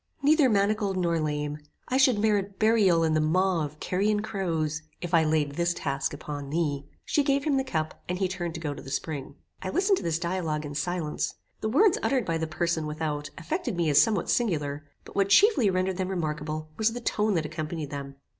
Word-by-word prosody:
Neither 295 Hz, -2 st, +5 dB
manacled 200 Hz, -2 st, +1 dB
nor 170 Hz, -2 st, +1 dB
lame, 150 Hz, -1 st, -2 dB, 0.3 s
I 260 Hz, -, +1 dB
should 265 Hz, -4 st, +5 dB
merit 205 Hz, -2 st, +1 dB
burial 210 Hz, -7 st, +4 dB
in 160 Hz, -1 st, +2 dB
the 155 Hz, -, +3 dB
maw 180 Hz, +2 st, +2 dB
of 150 Hz, +1 st, -7 dB
carrion 205 Hz, +3 st, 0 dB
crows, 165 Hz, -7 st, -2 dB, 0.2 s
if 175 Hz, 0 st, -6 dB
I 165 Hz, -1 st, +6 dB
laid 155 Hz, -2 st, +1 dB
this 170 Hz, +2 st, 0 dB
task 140 Hz, -1 st, -2 dB
upon 145 Hz, -1 st, -6 dB
thee." 145 Hz, -3 st, -1 dB, 0.2 s
She 290 Hz, -, +2 dB
gave 275 Hz, 0 st, +1 dB
him 295 Hz, -2 st, +1 dB
the 265 Hz, -, +1 dB
cup, 155 Hz, -11 st, -3 dB
and 180 Hz, -, -1 dB
he 190 Hz, 0 st, +1 dB
turned 175 Hz, -2 st, -4 dB
to -, -, -4 dB
go 150 Hz, -3 st, -3 dB
to -, -, -9 dB
the 135 Hz, -, -10 dB
spring. 140 Hz, 0 st, -4 dB, 0.3 s
I 185 Hz, -, -3 dB
listened 385 Hz, -, +2 dB
to -, -, -5 dB
this 165 Hz, -1 st, 0 dB
dialogue 170 Hz, -3 st, -2 dB
in 145 Hz, -, -6 dB
silence. 155 Hz, +2 st, -2 dB, 0.2 s
The 220 Hz, -, -2 dB
words 355 Hz, -, +4 dB
uttered 260 Hz, -5 st, +1 dB
by 165 Hz, -2 st, -1 dB
the 160 Hz, -, -1 dB
person 160 Hz, 0 st, -1 dB
without, 150 Hz, -1 st, -3 dB
affected 305 Hz, -, -3 dB
me 165 Hz, -3 st, +2 dB
as 145 Hz, -, +7 dB
somewhat 215 Hz, -6 st, +1 dB
singular, 150 Hz, -10 st, 0 dB, 0.2 s
but -, -, -13 dB
what 195 Hz, 0 st, +2 dB
chiefly 390 Hz, -, +5 dB
rendered 185 Hz, 0 st, 0 dB
them 185 Hz, -1 st, -2 dB
remarkable, 155 Hz, -3 st, -3 dB
was 220 Hz, +1 st, +2 dB
the 245 Hz, -, -4 dB
tone 210 Hz, -3 st, +1 dB
that 160 Hz, -2 st, 0 dB
accompanied 155 Hz, -1 st, -4 dB
them. 140 Hz, -1 st, -6 dB
170 Hz, 210 wpm, -27 LUFS, 155-205 Hz, 0.3 s, as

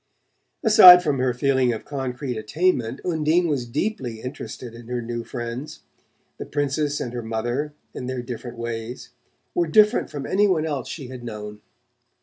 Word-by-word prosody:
Aside 185 Hz, -6 st, +10 dB
from 145 Hz, -5 st, 0 dB
her 130 Hz, 0 st, +2 dB
feeling 130 Hz, 0 st, +2 dB
of 110 Hz, -, -7 dB
concrete 130 Hz, -2 st, -4 dB
attainment. 130 Hz, +2 st, 0 dB
Undine 165 Hz, 0 st, +2 dB
was 135 Hz, -6 st, -1 dB
deeply 125 Hz, -, -3 dB
interested 125 Hz, -1 st, -7 dB
in 115 Hz, 0 st, -12 dB
her 125 Hz, 0 st, -2 dB
new 120 Hz, 0 st, -4 dB
friends. 120 Hz, +4 st, -6 dB, 0.6 s
The -, -, -5 dB
Princess 145 Hz, 0 st, -1 dB
and 120 Hz, -, -4 dB
her 120 Hz, -, -3 dB
mother, 120 Hz, +6 st, -3 dB, 0.2 s
in 125 Hz, -, -6 dB
their 130 Hz, -1 st, -3 dB
different 120 Hz, 0 st, -7 dB
ways, 115 Hz, +1 st, -6 dB, 0.4 s
were 170 Hz, -1 st, +1 dB
different 210 Hz, +7 st, +4 dB
from 145 Hz, -2 st, -6 dB
any 205 Hz, +2 st, +3 dB
one 165 Hz, -5 st, +1 dB
else 145 Hz, -5 st, -3 dB
she 135 Hz, -6 st, -7 dB
had 130 Hz, -2 st, -9 dB
known. 105 Hz, -2 st, -7 dB
130 Hz, 160 wpm, -23 LUFS, 120-155 Hz, 0.6 s, Aside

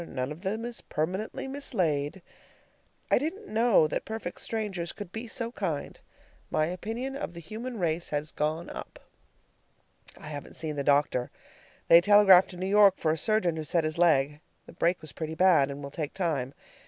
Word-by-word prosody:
None 130 Hz, +1 st, -3 dB
of 155 Hz, +3 st, -8 dB
them 215 Hz, +4 st, -3 dB
is 240 Hz, -1 st, -5 dB
permanently 185 Hz, -, -3 dB
mislaid. 180 Hz, -, -2 dB, 0.9 s
I -, -, +5 dB
didn't 330 Hz, -, -5 dB
know 225 Hz, -7 st, +5 dB
that -, -, -3 dB
perfect 220 Hz, -5 st, -6 dB
strangers 195 Hz, -6 st, -3 dB
could 205 Hz, -4 st, -8 dB
be 225 Hz, +3 st, -6 dB
so 230 Hz, +1 st, -3 dB
kind. 170 Hz, -11 st, -4 dB, 0.5 s
My 155 Hz, -, +1 dB
opinion 225 Hz, +10 st, -4 dB
of 175 Hz, -10 st, -5 dB
the -, -, -7 dB
human 225 Hz, +8 st, -6 dB
race 170 Hz, -2 st, -1 dB
has 150 Hz, +1 st, -3 dB
gone 155 Hz, +3 st, -2 dB
up. -, -, -8 dB, 1.2 s
I 150 Hz, -, -10 dB
haven't 145 Hz, -2 st, -8 dB
seen 155 Hz, -2 st, -3 dB
the 140 Hz, -, -2 dB
doctor. 140 Hz, -3 st, +2 dB, 0.6 s
They 170 Hz, +1 st, +8 dB
telegraphed 195 Hz, -1 st, +7 dB
to 180 Hz, -, -10 dB
New 185 Hz, -, -3 dB
York 200 Hz, -1 st, +5 dB
for 155 Hz, -, +1 dB
a -, -, +1 dB
surgeon, 180 Hz, -2 st, +1 dB
who 160 Hz, -, -3 dB
set 165 Hz, +3 st, +1 dB
his 155 Hz, +1 st, -2 dB
leg. 150 Hz, -4 st, +3 dB, 0.3 s
The -, -, -13 dB
break 175 Hz, +2 st, +1 dB
was 155 Hz, -2 st, -9 dB
pretty 160 Hz, 0 st, -5 dB
bad, 165 Hz, -6 st, +4 dB
and 140 Hz, +1 st, -7 dB
will 140 Hz, -, -7 dB
take 150 Hz, +1 st, -5 dB
time. 145 Hz, -8 st, -1 dB
175 Hz, 180 wpm, -28 LUFS, 155-210 Hz, 1.2 s, They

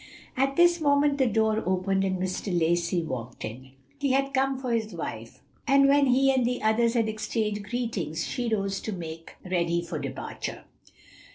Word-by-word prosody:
At 270 Hz, +1 st, +1 dB
this 345 Hz, 0 st, +4 dB
moment 285 Hz, -1 st, +3 dB
the 260 Hz, -, +4 dB
door 220 Hz, 0 st, +2 dB
opened, 190 Hz, +1 st, 0 dB
and 190 Hz, -1 st, 0 dB
Mr. 185 Hz, +2 st, -3 dB
Lacey 170 Hz, +1 st, +1 dB
walked 125 Hz, -5 st, -5 dB
in. 130 Hz, +4 st, -9 dB, 0.3 s
He 275 Hz, -2 st, +1 dB
had 275 Hz, +1 st, +1 dB
come 270 Hz, 0 st, +1 dB
for 255 Hz, -2 st, -4 dB
his 220 Hz, -2 st, -1 dB
wife, -, -, -7 dB, 0.2 s
and 275 Hz, 0 st, +5 dB
when 280 Hz, 0 st, +4 dB
he 270 Hz, +2 st, +4 dB
and 260 Hz, -1 st, +2 dB
the 245 Hz, 0 st, -1 dB
others 230 Hz, +2 st, +2 dB
had 230 Hz, -2 st, +2 dB
exchanged 215 Hz, -1 st, -2 dB
greetings, 215 Hz, -9 st, -2 dB
she 245 Hz, -2 st, -2 dB
rose 195 Hz, -2 st, 0 dB
to 220 Hz, -, -4 dB
make 165 Hz, -2 st, -8 dB
ready 170 Hz, -2 st, 0 dB
for 170 Hz, -3 st, -5 dB
departure. 135 Hz, -2 st, -6 dB
220 Hz, 175 wpm, -27 LUFS, 175-265 Hz, 0.3 s, and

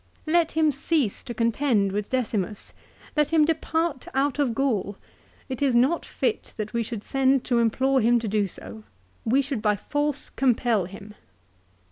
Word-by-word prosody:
"Let 330 Hz, +1 st, +2 dB
him 315 Hz, -1 st, +3 dB
cease 280 Hz, -4 st, -1 dB
to 240 Hz, -, -5 dB
contend 230 Hz, -3 st, +1 dB
with 205 Hz, +1 st, -3 dB
Decimus. 215 Hz, -5 st, -2 dB, 0.4 s
Let 300 Hz, -2 st, +2 dB
him 320 Hz, -2 st, +4 dB
depart 320 Hz, -2 st, -1 dB
out 280 Hz, +1 st, +1 dB
of 255 Hz, -6 st, +1 dB
Gaul. 215 Hz, -7 st, 0 dB, 0.5 s
It 260 Hz, -1 st, -5 dB
is 270 Hz, -4 st, +2 dB
not 265 Hz, +8 st, +2 dB
fit 450 Hz, -, -2 dB
that 215 Hz, 0 st, -4 dB
we 235 Hz, -, +1 dB
should 225 Hz, -2 st, -5 dB
send 270 Hz, -1 st, +2 dB
to 240 Hz, -2 st, +1 dB
implore 260 Hz, +4 st, +2 dB
him 240 Hz, +2 st, +4 dB
to 230 Hz, -1 st, -2 dB
do 205 Hz, -1 st, +1 dB
so. 105 Hz, -, -10 dB, 0.4 s
We 265 Hz, +5 st, +3 dB
should 270 Hz, -5 st, -3 dB
by 210 Hz, -1 st, +2 dB
force 290 Hz, +7 st, -2 dB
compel 240 Hz, -6 st, +1 dB
him." 200 Hz, +3 st, -11 dB
250 Hz, 165 wpm, -25 LUFS, 215-285 Hz, 0.5 s, him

